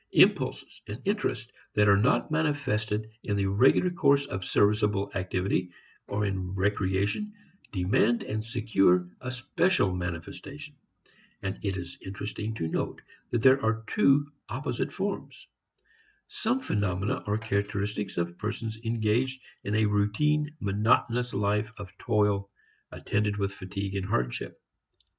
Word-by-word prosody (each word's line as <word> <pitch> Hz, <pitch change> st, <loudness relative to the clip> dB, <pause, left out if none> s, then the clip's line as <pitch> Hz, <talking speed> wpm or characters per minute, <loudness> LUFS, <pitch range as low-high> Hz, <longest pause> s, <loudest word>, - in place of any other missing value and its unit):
Impulses -, -, +3 dB
and 105 Hz, +3 st, -6 dB
interests 125 Hz, -, -1 dB, 0.2 s
that 105 Hz, 0 st, +5 dB
are 100 Hz, -, +7 dB
not 115 Hz, +9 st, +2 dB
manifested 110 Hz, -9 st, 0 dB
in 100 Hz, -2 st, -1 dB
the 100 Hz, -, +1 dB
regular 125 Hz, -, +4 dB
course 140 Hz, -4 st, +3 dB
of 95 Hz, -8 st, -4 dB
serviceable 105 Hz, 0 st, +2 dB
activity 90 Hz, 0 st, -1 dB, 0.4 s
or 105 Hz, +1 st, -1 dB
in 95 Hz, -1 st, -2 dB
recreation 100 Hz, -, 0 dB, 0.4 s
demand 105 Hz, +5 st, +2 dB
and 110 Hz, +1 st, -3 dB
secure 105 Hz, -6 st, +2 dB
a 125 Hz, -, -4 dB
special 130 Hz, -, +1 dB
manifestation. 90 Hz, -, -6 dB, 0.7 s
And 100 Hz, 0 st, -3 dB
it 100 Hz, -2 st, -1 dB
is 90 Hz, -1 st, -7 dB
interesting 105 Hz, +3 st, -5 dB
to 80 Hz, -7 st, -2 dB
note -, -, -2 dB, 0.3 s
that 115 Hz, -2 st, 0 dB
there 135 Hz, +1 st, +6 dB
are 110 Hz, 0 st, +1 dB
two 145 Hz, -, +3 dB, 0.2 s
opposite -, -, -2 dB
forms. -, -, -4 dB, 0.8 s
Some 240 Hz, +4 st, -1 dB
phenomena 100 Hz, -, -1 dB
are 105 Hz, +1 st, +1 dB
characteristic 100 Hz, -1 st, -2 dB
of 85 Hz, 0 st, -2 dB
persons 110 Hz, +1 st, -4 dB
engaged 115 Hz, +3 st, +1 dB, 0.2 s
in 105 Hz, -, -1 dB
a 110 Hz, 0 st, +4 dB
routine 110 Hz, +9 st, +2 dB
monotonous 115 Hz, +4 st, +2 dB
life 105 Hz, +2 st, 0 dB
of 100 Hz, -4 st, -9 dB
toil 100 Hz, -2 st, +1 dB, 0.4 s
attended 105 Hz, 0 st, -1 dB
with 100 Hz, -1 st, -1 dB
fatigue 100 Hz, +1 st, -5 dB
and 95 Hz, -1 st, -2 dB
hardship. 60 Hz, -11 st, -2 dB
105 Hz, 130 wpm, -28 LUFS, 100-120 Hz, 0.8 s, are